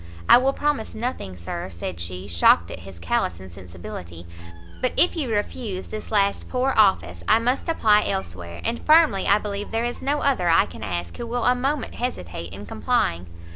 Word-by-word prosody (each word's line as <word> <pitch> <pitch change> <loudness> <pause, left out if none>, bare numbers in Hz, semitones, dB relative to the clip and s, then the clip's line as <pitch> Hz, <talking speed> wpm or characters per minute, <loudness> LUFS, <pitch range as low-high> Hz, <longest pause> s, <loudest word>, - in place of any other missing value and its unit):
"I - - +9
will 265 +2 +2
promise 290 -5 -2
nothing, 220 - -4
Sir," 85 0 -5
said 85 0 -6
she, 90 +3 -6
shocked 85 -1 +4
at - - -7
his 95 0 -11
callous 85 0 -1
insensibility; 90 -2 -10 0.6
"but 255 - 0
if 360 - +4
you 295 -7 -2
refuse 205 -2 -3
this 215 - -7
last 200 -2 +1
poor 260 +1 +1
office, 85 - +2
I - - +6
must 250 +8 -1
apply 215 -10 +3
elsewhere; 85 -2 -5
and 235 +1 -2
firmly 310 -10 +4
I 205 - +5
believe 205 -1 -4
there 225 +1 -1
is 240 - -4
no 290 +2 0
other 210 -11 +2
I 165 - +5
can - - -11
ask 85 -4 -4
who 235 - -5
will 240 0 -2
a 250 - +5
moment 270 +1 -2
hesitate 85 - -5
in 100 +2 -8
complying." 160 - -1
200 Hz, 185 wpm, -23 LUFS, -, 0.6 s, I